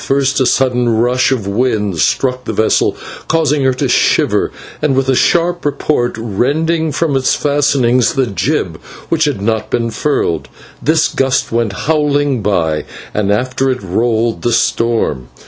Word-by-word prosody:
First 135 0 +1
a 130 - +3
sudden 125 -2 +1
rush 125 +3 +2
of 120 -7 -1
wind 105 -4 -1
struck 125 - 0
the - - -3
vessel, 110 - +1 0.3
causing 150 -3 +1
her 130 - +3
to - - -1
shiver, - - +2 0.3
and 150 -3 +1
with 135 0 +1
a 130 - +3
sharp 175 +5 +1
report 145 -3 -1
rending 150 - 0
from 155 -2 0
its 130 -1 +2
fastenings 135 -4 +2
the 135 -1 +2
jib, 100 -7 -2 0.3
which 160 -1 +2
had 135 -10 -2
not 110 0 -1
been 115 -1 -1
furled. 110 - -1 0.3
This 155 +1 +2
gust 135 -1 0
went 115 -3 0
howling 145 -4 +1
by, 80 -7 0 0.3
and 100 -1 0
after 130 +5 0
it 125 -4 -2
rolled 115 +4 0
the 120 - 0
storm. 115 - 0
125 Hz, 155 wpm, -15 LUFS, 110-145 Hz, 0.3 s, a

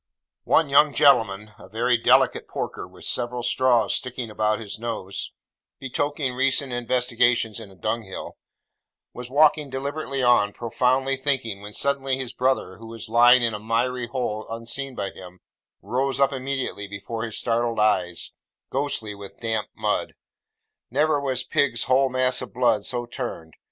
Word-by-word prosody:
One 160 - +4
young 140 +1 +4
gentleman 110 -8 +4
(a - - -13
very 120 +4 +2
delicate 115 - +3
porker - - -5
with - - -13
several 120 0 -1
straws 120 -4 +2
sticking 125 -3 -3
about 105 0 0
his 110 -1 -5
nose, 110 -5 -3 0.5
betokening 135 0 -1
recent 135 0 +1
investigations 120 -2 +1
in 110 -3 -10
a 95 - -16
dung 110 +5 -2
hill) 95 -3 -8 0.8
was 125 0 -8
walking 150 +1 +4
deliberately 135 0 -3
on, 110 -4 +4
profoundly 125 +4 +1
thinking, 130 -7 -1
when 105 +1 -9
suddenly 135 0 0
his 130 -1 -4
brother, 125 -7 0
who 115 +2 -11
was 115 -1 -8
lying 120 +2 +6
in 115 -1 +1
a 105 - -4
miry 120 +3 -1
hole 115 -4 -3
unseen 120 +4 -5
by 100 -3 -3
him, 90 -1 -12 0.4
rose 130 +7 -1
up 140 0 +3
immediately 130 -6 -3
before 105 +3 -6
his 115 -2 -4
startled 115 -1 0
eyes, 90 -5 +1 0.4
ghostly 130 -6 -1
with 100 -1 -11
damp 110 -2 -1
mud. - - -1 0.7
Never 145 +3 +2
was 130 -2 -1
pig's 125 -3 +1
whole 130 +2 +3
mass 130 0 +2
of - - -8
blood 120 -4 +2
so 120 -1 -2
turned. 120 - -6
120 Hz, 155 wpm, -24 LUFS, 110-135 Hz, 0.8 s, lying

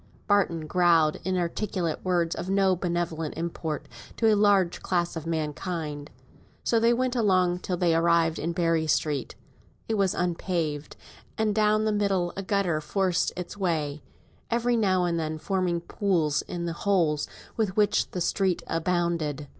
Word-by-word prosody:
Barton 185 -6 +1
growled 165 -2 +3
inarticulate 180 -1 -2
words 175 -2 +1
of 185 - -5
no 195 -1 +3
benevolent 170 -3 -2
import 165 -2 -4 0.3
to 225 -1 +4
a - - +4
large 200 -4 +3
class 175 -2 -1
of 165 0 -5
mankind, 155 -1 -3
and - - -29 0.3
so 230 - +2
they 230 +1 +4
went 255 +1 0
along 185 -6 +2
till 180 0 -3
they 170 -1 +2
arrived 165 -1 +3
in 165 - -1
Berry 165 -2 +1
Street. 150 -3 0 0.5
It 220 -2 -1
was 195 -2 +2
unpaved; 170 -4 -2 0.4
and 220 -1 +1
down 215 0 +2
the 215 - +2
middle 195 -4 0
a 195 - -3
gutter 190 -5 0
forced 185 +1 0
its 180 +2 -6
way, 155 -6 -1 0.5
every 240 +1 +1
now 190 -5 +2
and 170 -1 0
then 155 -1 -3
forming 180 0 -1
pools 165 -6 0
in 170 -1 -4
the 170 - -2
holes 170 -6 +1 0.3
with 210 -4 -1
which 210 -1 +2
the 180 - -4
street 185 +1 0
abounded. 165 -4 -1
175 Hz, 155 wpm, -27 LUFS, 165-195 Hz, 0.5 s, to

